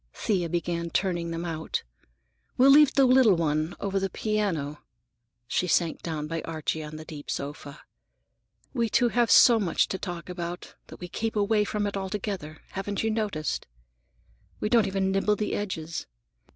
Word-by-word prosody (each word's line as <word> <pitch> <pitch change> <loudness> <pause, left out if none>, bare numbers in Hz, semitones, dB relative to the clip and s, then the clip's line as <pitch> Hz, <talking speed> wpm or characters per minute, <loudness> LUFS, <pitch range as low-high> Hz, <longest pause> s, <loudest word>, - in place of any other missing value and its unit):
Thea 180 -6 0
began 170 0 -2
turning 175 -2 -1
them 165 +1 -4
out. 160 -2 -3 0.7
"We'll 265 +2 +7
leave 295 0 +7
the 275 - +6
little 255 -6 +6
one, 155 0 0
over 195 -1 -1
the 195 0 -1
piano." 180 -10 -2 0.7
She 180 - 0
sank 170 -1 +1
down 155 -3 -3
by 165 +1 -3
Archie 160 -1 -3
on 150 0 -8
the 155 0 -8
deep 150 -2 -9
sofa. 145 +1 -5 0.9
"We 235 -4 0
two 245 +1 +3
have 240 0 +2
so 235 -2 +7
much 180 -6 +1
to 190 - -3
talk 175 -3 -6
about 175 -1 -6
that - - -12
we 180 - -6
keep 225 +5 -3
away 210 0 +2
from 210 0 -1
it 200 - -2
altogether; 190 -5 -4
have 195 +1 -5 0.2
you 220 - +1
noticed? 205 -9 -2 0.9
We 210 - -1
don't 230 -3 +4
even 190 0 0
nibble 195 +2 +2
the 210 0 -2
edges. 165 -6 -4
185 Hz, 165 wpm, -27 LUFS, 165-210 Hz, 0.9 s, We'll